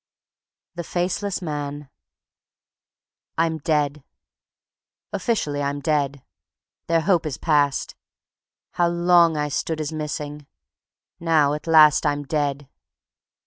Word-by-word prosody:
The 170 0 -5
Faceless 185 +3 -2
Man 145 -2 -5 1.5
I'm 160 -1 +1
dead. 150 -2 0 1.1
Officially 150 - -1
I'm 140 0 -2
dead. 140 -3 -1 0.6
Their 165 0 +2
hope 175 -1 +2
is 140 - -4
past. 145 -3 +1 0.8
How 175 - +1
long 170 -1 +4
I 150 0 0
stood 155 +2 -2
as 155 0 -3
missing! 150 -1 -5 0.7
Now, 155 -4 +3
at 150 +2 -6
last 155 -2 +6
I'm 145 0 -1
dead. 145 -1 -2
150 Hz, 100 wpm, -23 LUFS, 145-165 Hz, 1.5 s, last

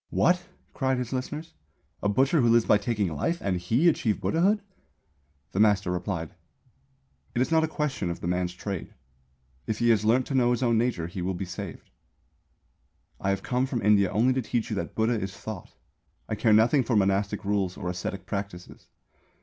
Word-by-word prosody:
"What," 180 +1 +2 0.3
cried 130 -1 0
his 125 0 -3
listeners, 150 +5 -4 0.5
"a 105 - +1
butcher, 135 +8 +3
who 120 - +3
lives 115 0 +4
by 105 - +4
taking 105 -6 -1
life, 165 - 0
and 95 -2 -1
he 115 - +2
achieve 115 -10 +2
Buddhahood?" 195 +5 +2 0.9
The 95 - -2
master 105 -3 +3
replied: 90 -3 -3 1.0
"It 120 - +2
is 130 - -5
not 160 -1 +4
a - - +2
question 150 - -2
of 85 - -4
the - - -7
man's 90 0 -1
trade. 95 -1 -5 0.7
If 110 - -1
he 120 0 +3
has 105 -2 +3
learnt 120 +4 +3
to - - -5
know 125 -2 +3
his 120 +1 +1
own 120 -2 +3
nature 115 -9 0
he 85 +2 -6
will 95 +1 -2
be 95 - -4
saved. 95 0 -8 1.3
"I 100 - -1
have 100 0 -1
come 125 +1 0
from 125 -5 -3
India 100 -2 +4
only 125 +4 +3
to 130 - 0
teach 115 0 -2
you - - 0
that - - -4
Buddha 110 +2 +2
is 95 -2 -5
Thought. 110 -5 -8 0.5
I - - -3
care 110 +1 +2
nothing 115 +6 +5
for 115 0 0
monastic 100 0 +1
rules 100 -3 0
or - - -5
ascetic 90 +1 -4
practices. 100 -3 -6
110 Hz, 190 wpm, -27 LUFS, 95-125 Hz, 1.3 s, nothing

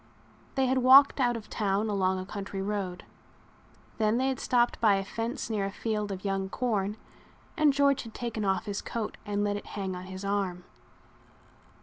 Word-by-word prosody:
They 265 -1 +2
had 260 +1 +2
walked 270 +3 +7
out 240 -2 +2
of 215 -2 -10
town 205 0 0
along 190 -2 +1
a 185 - -4
country 200 0 -6
road. 195 -3 -3 0.9
Then 215 +1 +2
they 260 +1 +1
had 265 - -2
stopped 240 -1 +1
by 210 -3 +5
a 195 - -1
fence 230 +6 -4
near 210 -3 -1
a - - -5
field 210 -1 -2
of 190 0 -6
young 195 -1 -1
corn 210 -3 -1 0.6
and 305 -3 +4
George 280 -1 +3
had 225 -2 -11
taken 230 -3 -3
off 190 -1 0
his 205 -2 -3
coat 225 -2 -4
and 205 0 0
let 205 0 0
it 205 - -9
hang 190 -2 -2
on 180 0 -7
his 190 +1 -7
arm. 195 -3 -1
210 Hz, 190 wpm, -29 LUFS, 195-240 Hz, 0.9 s, walked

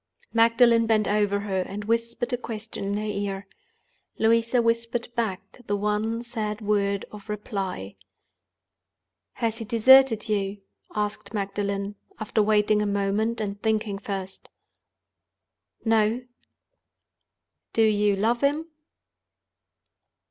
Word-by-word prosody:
Magdalen 230 0 +5
bent 215 -2 +2
over 205 -1 +1
her, 195 -2 -1
and 200 +3 -6
whispered 230 +2 -1
a - - +4
question 225 -4 -6
in 200 +1 -1
her 210 - -2
ear. 200 -2 -3 0.7
Louisa 230 +2 +3
whispered 230 +1 0
back 205 -3 -3
the 205 - +1
one 210 +3 -1
sad 215 -3 -3
word 200 -2 0
of 210 0 -12
reply. 195 - -4 1.4
"Has 225 0 -2
he 225 - -5
deserted 235 0 +6
you?" 200 -1 -1 0.4
asked 210 +1 -3
Magdalen, 200 0 -2 0.2
after 215 0 0
waiting 210 0 +3
a 210 - 0
moment, 205 +3 0
and 205 -1 -4
thinking 215 -2 0
first. 195 -1 -6 1.4
"No." 225 +2 +2 1.5
"Do 225 - +3
you 210 -2 +3
love 225 +4 +1
him?" 290 +3 +1
210 Hz, 110 wpm, -25 LUFS, 200-230 Hz, 1.5 s, deserted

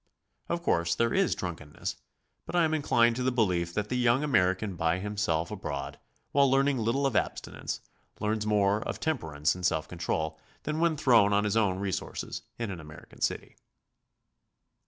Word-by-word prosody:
Of 170 0 -1
course 85 - +2
there 115 0 +1
is 195 -2 +2
drunkenness, 80 -5 -5 0.5
but - - -4
I 175 - +5
am 160 -1 +1
inclined 120 -6 +3
to - - -2
the 130 +1 +2
belief 90 -8 +1
that 105 0 -1
the 125 - -1
young 125 +3 +3
American 95 -6 +2
by 80 +1 +1
himself 95 -5 -1
abroad, 70 0 -5 0.3
while 140 -1 +4
learning 135 0 +3
little 115 +5 +1
of 135 -5 0
abstinence, - - -2 0.4
learns 105 0 -1
more 105 0 +3
of - - -4
temperance 80 - 0
and 90 - -9
self 80 -2 +1
control 80 -2 -2 0.2
than 150 +1 -2
when 165 -2 +2
thrown 115 -8 +5
on 100 0 +3
his 105 0 0
own 100 -5 +2
resources 95 -1 -4 0.2
in 115 -4 -3
an 90 - -6
American 75 -1 -13
city. - - -2
105 Hz, 170 wpm, -29 LUFS, 85-130 Hz, 0.5 s, I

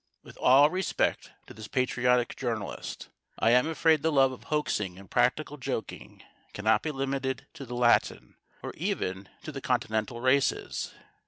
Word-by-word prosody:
With - - -14
all 140 +4 +6
respect 185 0 -1 0.2
to - - -12
this 110 -1 -9
patriotic 125 -1 +1
journalist, 115 -5 -5 0.3
I 115 - +3
am 125 +4 +4
afraid 160 -1 +3
the 160 - +1
love 135 -2 +4
of 130 - -11
hoaxing 105 -11 -1
and 95 -1 -14
practical - - +1
joking - - -6 0.3
cannot 110 +2 +2
be 160 - -3
limited 135 -1 -2
to 135 - -9
the 120 - -6
Latin, 120 -1 +2 0.3
or - - -5
even 95 +1 -3
to 155 - -6
the 135 -2 -7
Continental 115 -2 -1
races. 130 +2 +1
125 Hz, 155 wpm, -28 LUFS, 115-140 Hz, 0.3 s, all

